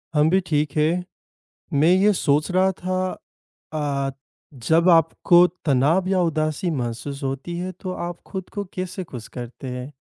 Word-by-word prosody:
हम 150 +1 +4
भी 190 +2 +4
ठीक 150 -2 +1
हैं। 165 +4 +2 0.8
मैं 155 - +5
ये 195 +3 +4
सोच 150 0 +1
रहा 185 +1 +3
था 185 0 -2 0.6
अ, 140 -3 -1 0.4
जब 160 +8 +2
आपको 170 +1 +5 0.2
तनाव 150 +6 +3
या 190 -1 +2
उदासी 155 +1 0
महसूस 135 +1 -4
होती 135 +6 -3
है, 185 +1 -3
तो 185 +1 -7
आप 175 -1 -5
खुद 190 -2 -6
को 205 - -2
कैसे 185 0 -4
खुश 125 -9 -9
करते 125 +2 -7
हैं? 125 +2 -5
160 Hz, 155 wpm, -23 LUFS, 140-185 Hz, 0.8 s, मैं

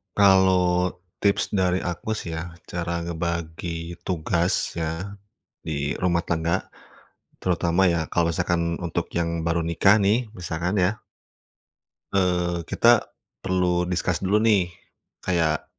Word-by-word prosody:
Kalau 95 -2 +4 0.2
tips 100 -1 +1
dari 95 -2 +1
aku 90 +5 -3
sih 85 - -5
ya, 85 +1 -5 0.2
cara 85 -1 -2
ngebagi 85 0 -4
tugas 85 +1 0
ya, 80 +4 -3 0.5
di 75 -2 -2
rumah 90 -2 +3
tangga, 85 +2 0 0.8
terutama 90 +1 +2
ya 85 -2 0
kalau 85 +1 +1
misalkan 85 0 0
untuk 85 -3 -3
yang 85 -1 -1
baru 85 0 0
nikah 95 +5 +4
nih 110 +3 +2
misalkan 85 +3 -2
ya 105 +4 -2 1.1
eee, 90 -2 +1
kita 120 -1 +4 0.3
perlu 90 -2 +1
discuss 90 -1 -1
dulu 95 +2 +2
nih, 100 -6 +3 0.6
kayak, 80 -4 +1
85 Hz, 120 wpm, -24 LUFS, 85-95 Hz, 1.1 s, Kalau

